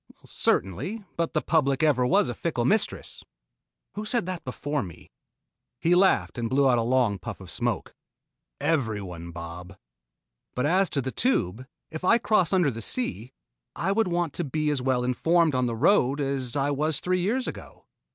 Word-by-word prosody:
"Certainly 175 - -1
but 170 -1 -1
the - - 0
public 145 -3 +2
ever 130 -5 +3
was 125 - +3
a 120 - -2
fickle 120 -2 -2
mistress. 215 - -1 0.7
Who 210 - -5
said 220 -1 0
that 185 -2 -5
before 145 +3 -3
me?" 90 -5 -10 0.7
He 170 - +2
laughed 125 - +3
and 115 -1 -2
blew 135 +1 +3
out 125 -2 +4
a - - +2
long 120 -4 +1
puff - - -7
of - - -11
smoke. - - -2 0.7
"Everyone, 105 - -2
Bob." 85 +2 -9 0.8
"But 125 - 0
as 185 +3 +3
to 140 - -1
the 130 - -3
Tube, 125 - 0 0.2
if 160 +2 -6
I 230 +6 +5
cross 210 -7 +2
under 180 -7 +3
the 115 -1 -7
sea, 130 - -2 0.4
I 190 - -1
would 220 +1 +2
want 175 -4 -1
to 175 - -2
be 155 +1 -1
as 140 -3 -1
well 125 -1 +1
informed 165 +6 +2
on 125 -1 +1
the 115 - -2
road 140 - +3
as 135 -3 -1
I 140 0 +1
was 150 +1 0
three 185 0 0
years 240 +8 0
ago. - - -9
140 Hz, 180 wpm, -26 LUFS, 120-175 Hz, 0.8 s, I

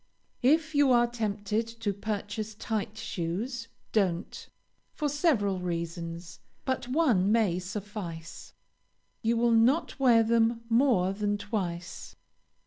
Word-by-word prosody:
If 310 +4 +3
you 285 -2 +4
are 240 -1 +5
tempted 215 -2 -2
to 225 -3 -3
purchase 210 +1 -4
tight 215 -1 -3
shoes, 220 +10 -3 0.2
don't, 185 -6 -1 0.5
for 300 - -1
several 270 - +1
reasons; 170 0 -5 0.3
but 260 -2 -1
one 250 - +3
may 210 -6 +2
suffice 185 -4 -7 0.7
you 230 +1 +1
will 235 0 +3
not 245 +8 +3
wear 240 -4 +5
them 230 +1 +2
more 230 -7 +3
than 205 0 -1
twice. 185 -4 -4
215 Hz, 115 wpm, -29 LUFS, 190-240 Hz, 0.7 s, are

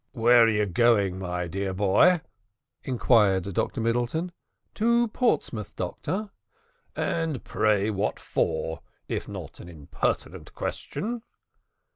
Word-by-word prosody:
"Where 120 -1 +6
are - - +3
you 105 -1 +2
going, 100 -2 +2
my 90 -1 -3
dear 95 +2 -3
boy?" 105 - +4 0.6
inquired 110 -7 +3
Dr 115 - -1
Middleton. 120 +10 -1 0.4
"To 235 +1 +2
Portsmouth, 130 - -1
doctor." 185 - -4 0.6
"And 160 -6 -1
pray 105 0 +1
what 100 +1 -1
for, 80 0 -2 0.3
if - - -3
not - - -8
an 85 - -10
impertinent 75 -4 -4
question?" 235 +3 -4
110 Hz, 110 wpm, -26 LUFS, 95-155 Hz, 0.6 s, Where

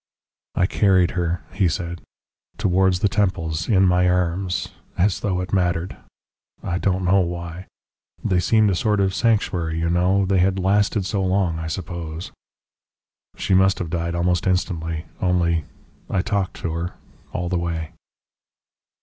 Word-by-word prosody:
"I 90 - +3
carried 95 -2 +3
her," 85 -1 -1
he 95 -1 +2
said, 85 +1 -3 0.6
"towards 95 -2 +2
the 105 - +4
temples, 85 -6 -1
in 95 -4 +5
my 90 0 +3
arms 90 0 0 0.3
as 95 +1 +2
though 95 -3 -1
it 90 - -6
mattered. 90 -2 0 0.7
I 85 +1 -1
don't 95 -1 0
know 95 +2 +4
why. 85 0 -4 0.6
They 90 -2 +2
seemed 110 +3 +3
a - - +1
sort 105 +3 +1
of 95 -1 +2
sanctuary, 90 -8 +1
you 85 +1 0
know, 95 +3 +2
they 95 0 +2
had 95 +1 +2
lasted 100 +1 +2
so 95 0 -1
long, 90 -3 +1
I 80 - -4
suppose. 85 -1 -5 1.1
"She 95 +2 0
must 95 +1 +4
have 85 -3 -4
died 85 0 -2
almost 90 +1 +1
instantly. 85 -3 -1 0.2
Only 85 -3 +1 0.4
I 95 - 0
talked 100 -4 -1
to 85 - -2
her 85 +2 -4 0.4
all 90 -1 -3
the 90 0 0
way." 85 -1 -3
90 Hz, 150 wpm, -22 LUFS, 85-95 Hz, 1.1 s, in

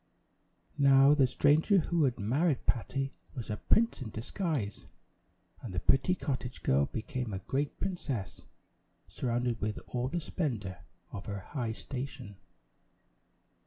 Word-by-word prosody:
Now 135 0 +7
the 140 -3 +5
stranger 150 - +4
who 170 -2 +2
had 125 -3 0
married 135 - +1
Patty 135 +3 -1 0.2
was 120 -5 -4
a 105 - -2
prince 225 - +2
in 120 - -4
disguise; 115 - -3 0.7
and 105 -7 -6
the - - +1
pretty 135 +7 +3
cottage 130 -6 -4
girl 70 +1 +3
became 125 0 -4
a - - -1
great 140 +2 -1
princess, 130 - -3 0.7
surrounded 120 -1 -1
with 105 +1 -1
all 125 0 -1
the 175 +6 -1
splendor 115 - -3 0.3
of 100 - -7
her 100 -2 -4
high 120 +1 -3
station! 125 -6 -6
130 Hz, 130 wpm, -31 LUFS, 110-145 Hz, 0.7 s, Now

